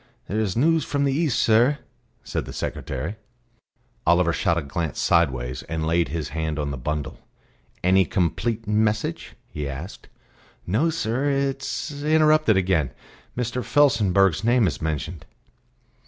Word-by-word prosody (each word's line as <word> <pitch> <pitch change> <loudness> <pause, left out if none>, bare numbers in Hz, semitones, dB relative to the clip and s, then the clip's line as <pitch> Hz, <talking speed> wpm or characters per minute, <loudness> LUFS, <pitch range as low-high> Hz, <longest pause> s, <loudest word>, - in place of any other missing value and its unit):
"There 105 - -1
is 105 -3 -1
news 160 +4 +3
from 140 -1 -1
the 140 -1 +2
East, 145 -4 +1
sir," 120 +6 +4 0.5
said - - -3
the - - -8
secretary. 75 +11 -4 0.9
Oliver 85 0 +4
shot 85 - +1
a 85 - -1
glance 80 +3 -3
sideways, 65 -7 +1
and 80 -1 -2
laid 85 0 +2
his 80 +2 -4
hand 80 0 -3
on 75 -1 -2
the 70 - -4
bundle. 75 +3 -4 0.6
"Any 95 +1 +4
complete 105 +7 -1
message?" 105 -3 0 0.2
he 75 -2 -4
asked. 75 +8 -8 0.6
"No, 115 - +1
sir; 135 -2 -1
it 135 -1 0
is 145 +1 -4
interrupted 155 -6 +4
again. 90 -7 +1 0.5
Mr. 125 0 -2
Felsenburgh's 100 - +3
name 120 0 +4
is 85 - -2
mentioned." 80 +1 -3
95 Hz, 140 wpm, -24 LUFS, 80-125 Hz, 0.9 s, sir